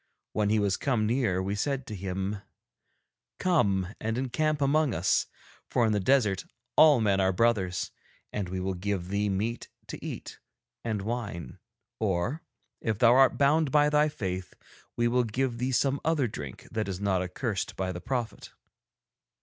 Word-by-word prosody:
When 105 Hz, -1 st, +1 dB
he 110 Hz, -, +3 dB
was 100 Hz, -3 st, +1 dB
come 120 Hz, -6 st, +1 dB
near 110 Hz, -6 st, +1 dB
we 100 Hz, +1 st, -2 dB
said 135 Hz, +5 st, -1 dB
to 105 Hz, -, -6 dB
him: 95 Hz, +2 st, -3 dB, 1.0 s
'Come 100 Hz, -, +1 dB
and 115 Hz, +1 st, -2 dB
encamp 150 Hz, +4 st, 0 dB
among 145 Hz, 0 st, +2 dB
us, 85 Hz, +3 st, +2 dB, 0.4 s
for 120 Hz, -, +2 dB
in 110 Hz, -, +2 dB
the 105 Hz, -, +2 dB
desert 105 Hz, -3 st, +2 dB, 0.3 s
all 150 Hz, -4 st, +7 dB
men 100 Hz, -3 st, +2 dB
are 95 Hz, 0 st, +3 dB
brothers, 95 Hz, -3 st, +1 dB, 0.4 s
and 100 Hz, -4 st, -2 dB
we 95 Hz, 0 st, -3 dB
will 95 Hz, +1 st, -1 dB
give 90 Hz, -1 st, -3 dB
thee 100 Hz, +1 st, 0 dB
meat 110 Hz, +5 st, -2 dB, 0.2 s
to -, -, -7 dB
eat -, -, -7 dB, 0.4 s
and 110 Hz, -4 st, -2 dB
wine, 105 Hz, -, -4 dB, 0.4 s
or, 110 Hz, -, 0 dB, 0.4 s
if 110 Hz, -3 st, -1 dB
thou 120 Hz, +1 st, +6 dB
art 135 Hz, +1 st, +5 dB
bound 145 Hz, +2 st, +3 dB
by 150 Hz, 0 st, +4 dB
thy 150 Hz, +1 st, +4 dB
faith, 95 Hz, -9 st, -4 dB, 0.4 s
we 120 Hz, 0 st, +3 dB
will 125 Hz, +1 st, +2 dB
give 120 Hz, +1 st, -1 dB
thee 130 Hz, +2 st, 0 dB
some 135 Hz, +3 st, +1 dB
other 155 Hz, -5 st, +2 dB
drink 75 Hz, -, -8 dB
that 110 Hz, -2 st, -2 dB
is 95 Hz, -2 st, -4 dB
not 100 Hz, -2 st, +1 dB
accursed 95 Hz, +3 st, -3 dB
by 95 Hz, -1 st, -2 dB
the 90 Hz, -1 st, -6 dB
prophet.' 120 Hz, -2 st, -3 dB
110 Hz, 165 wpm, -28 LUFS, 95-130 Hz, 1.0 s, all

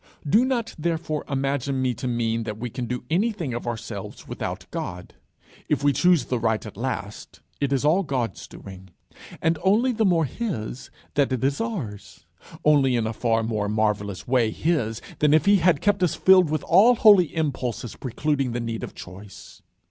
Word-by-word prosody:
Do 215 Hz, -, +4 dB
not, 240 Hz, -4 st, -1 dB
therefore, 160 Hz, -2 st, -2 dB
imagine 135 Hz, -1 st, -1 dB
me 130 Hz, -1 st, +1 dB
to 125 Hz, -, -5 dB
mean 115 Hz, -1 st, -1 dB
that 105 Hz, -2 st, -5 dB
we 120 Hz, +1 st, -5 dB
can 125 Hz, 0 st, -4 dB
do 125 Hz, +1 st, -4 dB
anything 185 Hz, -, 0 dB
of 120 Hz, 0 st, -5 dB
ourselves 115 Hz, -4 st, -6 dB
without -, -, -5 dB
God. 90 Hz, 0 st, -6 dB, 0.6 s
If -, -, 0 dB
we 145 Hz, -1 st, +4 dB
choose 175 Hz, -6 st, +3 dB
the 125 Hz, -, -2 dB
right 110 Hz, -1 st, 0 dB
at 110 Hz, -, -9 dB
last, 110 Hz, -3 st, -5 dB, 0.2 s
it 140 Hz, -1 st, -1 dB
is 135 Hz, 0 st, +1 dB
all 165 Hz, +6 st, +4 dB
God's 125 Hz, -, -3 dB
doing, 95 Hz, -1 st, -12 dB, 0.5 s
and 165 Hz, -1 st, +1 dB
only 220 Hz, +7 st, +3 dB
the 225 Hz, -2 st, 0 dB
more 170 Hz, -5 st, +3 dB
his 135 Hz, -, -5 dB, 0.2 s
that 140 Hz, -2 st, +1 dB
it 130 Hz, -1 st, -1 dB
is 140 Hz, +6 st, 0 dB
ours, 105 Hz, -, -6 dB, 0.4 s
only 140 Hz, -4 st, +4 dB
in 115 Hz, -2 st, 0 dB
a 110 Hz, -, -2 dB
far 115 Hz, 0 st, 0 dB
more 110 Hz, -2 st, -2 dB
marvellous 105 Hz, -2 st, -1 dB
way 120 Hz, -3 st, +2 dB
his 115 Hz, -6 st, -1 dB, 0.2 s
than 150 Hz, 0 st, +4 dB
if 155 Hz, -, +2 dB
he 200 Hz, 0 st, +6 dB
had 170 Hz, -4 st, +2 dB
kept 205 Hz, -2 st, +1 dB
us 180 Hz, -4 st, +2 dB
filled 185 Hz, -3 st, +5 dB
with 155 Hz, -1 st, -1 dB
all 210 Hz, +8 st, +5 dB
holy 200 Hz, -8 st, +5 dB
impulses 130 Hz, -7 st, -3 dB
precluding 135 Hz, 0 st, -2 dB
the 120 Hz, -, -2 dB
need 115 Hz, -1 st, -4 dB
of -, -, -7 dB
choice. 95 Hz, +2 st, -12 dB
135 Hz, 185 wpm, -24 LUFS, 115-165 Hz, 0.6 s, he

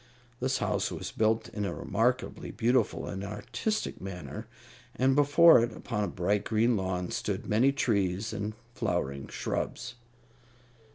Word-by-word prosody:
This 130 Hz, +1 st, 0 dB
house -, -, 0 dB
was -, -, -5 dB
built 110 Hz, +1 st, +1 dB
in 105 Hz, -, -4 dB
a 100 Hz, -, -2 dB
remarkably 125 Hz, +5 st, -1 dB
beautiful 120 Hz, +2 st, +1 dB
and 95 Hz, 0 st, -5 dB
artistic 120 Hz, -, -3 dB
manner, 90 Hz, -7 st, -7 dB, 0.5 s
and 130 Hz, +1 st, +3 dB
before 145 Hz, +3 st, +7 dB
it, 120 Hz, 0 st, 0 dB
upon 105 Hz, -3 st, -3 dB
a -, -, 0 dB
bright 100 Hz, +4 st, 0 dB
green 115 Hz, +2 st, +2 dB
lawn, 95 Hz, -2 st, -2 dB
stood -, -, -2 dB
many 120 Hz, +6 st, +3 dB
trees 105 Hz, -5 st, 0 dB
and 105 Hz, 0 st, -3 dB, 0.2 s
flowering 70 Hz, -, -2 dB
shrubs. 125 Hz, 0 st, -3 dB
110 Hz, 135 wpm, -29 LUFS, 100-125 Hz, 0.5 s, before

